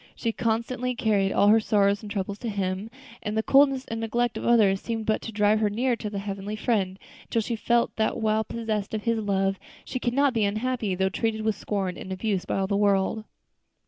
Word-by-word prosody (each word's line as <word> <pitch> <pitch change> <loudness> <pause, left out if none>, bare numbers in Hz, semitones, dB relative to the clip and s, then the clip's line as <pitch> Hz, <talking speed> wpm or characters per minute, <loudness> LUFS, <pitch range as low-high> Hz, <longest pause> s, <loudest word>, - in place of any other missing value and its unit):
She 230 - -1
constantly 235 +3 -1
carried 205 -4 +1
all 205 - +4
her 220 +2 +6
sorrows 205 -2 +2
and 210 - -8
troubles 200 0 -3
to 235 - -4
Him, 195 +1 -2 0.3
and 210 +1 -3
the 220 - +1
coldness 270 0 +4
and 225 - -4
neglect 235 +1 0
of - - -5
others 210 -5 +4
seemed 225 -2 -3
but 215 - +1
to 225 - -6
drive 210 0 +3
her 215 -1 +2
nearer 240 +4 0
to 215 - -4
that 205 - -5
Heavenly 200 +1 -4
Friend, 205 -4 0 0.3
until 230 - 0
she 235 - -2
felt 235 +2 +1
that 220 -1 +1
while 220 -1 +1
possessed 220 -2 -3
of 210 - -4
His 230 -1 +1
love, 195 -2 0 0.3
she 255 - -4
could 240 -1 -1
not 280 -1 +3
be 225 -3 +1
unhappy, 215 0 -1
though 190 +1 +1
treated 220 +2 -1
with 220 0 +1
scorn 195 -3 -3
and 190 - -8
abuse 190 0 -1
by - - -2
all 195 - +1
the 200 +1 -1
world. 200 +1 +1
215 Hz, 220 wpm, -26 LUFS, 200-230 Hz, 0.3 s, her